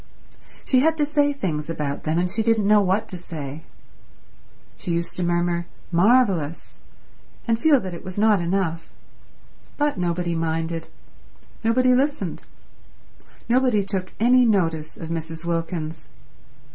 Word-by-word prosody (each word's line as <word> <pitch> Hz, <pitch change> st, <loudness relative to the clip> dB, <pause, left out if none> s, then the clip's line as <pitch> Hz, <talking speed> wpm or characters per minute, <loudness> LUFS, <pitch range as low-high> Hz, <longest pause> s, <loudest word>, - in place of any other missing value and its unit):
She 260 Hz, -, +3 dB
had 320 Hz, +4 st, +3 dB
to 300 Hz, -, +2 dB
say 290 Hz, -1 st, +2 dB
things 165 Hz, -, -3 dB
about 145 Hz, -3 st, -3 dB
them, 155 Hz, +1 st, 0 dB
and 180 Hz, +1 st, +2 dB
she 200 Hz, +5 st, -1 dB
didn't 220 Hz, -2 st, +2 dB
know 210 Hz, 0 st, +6 dB
what 200 Hz, +3 st, +1 dB
to 180 Hz, -, -6 dB
say. 155 Hz, -3 st, -7 dB, 1.1 s
She 175 Hz, -, -5 dB
used 170 Hz, 0 st, -2 dB
to 180 Hz, -, -1 dB
murmur, 175 Hz, 0 st, 0 dB, 0.2 s
"marvelous," 180 Hz, -, +2 dB, 0.7 s
and 230 Hz, -1 st, +2 dB
feel 300 Hz, -3 st, +5 dB
that 185 Hz, -2 st, -6 dB
it 170 Hz, -, -8 dB
was 185 Hz, 0 st, -8 dB
not 210 Hz, -2 st, +4 dB
enough. 170 Hz, -2 st, -2 dB, 0.9 s
But 295 Hz, -7 st, 0 dB
nobody 175 Hz, 0 st, -1 dB
minded. 165 Hz, 0 st, -2 dB, 0.8 s
Nobody 250 Hz, +3 st, +3 dB
listened. 285 Hz, +4 st, 0 dB, 1.1 s
Nobody 245 Hz, -4 st, +3 dB
took 190 Hz, -2 st, -3 dB
any 250 Hz, +3 st, +5 dB
notice 165 Hz, -8 st, 0 dB
of 165 Hz, -, -7 dB
Mrs. 165 Hz, 0 st, -5 dB
Wilkins. 165 Hz, -1 st, -3 dB
180 Hz, 135 wpm, -23 LUFS, 165-230 Hz, 1.1 s, know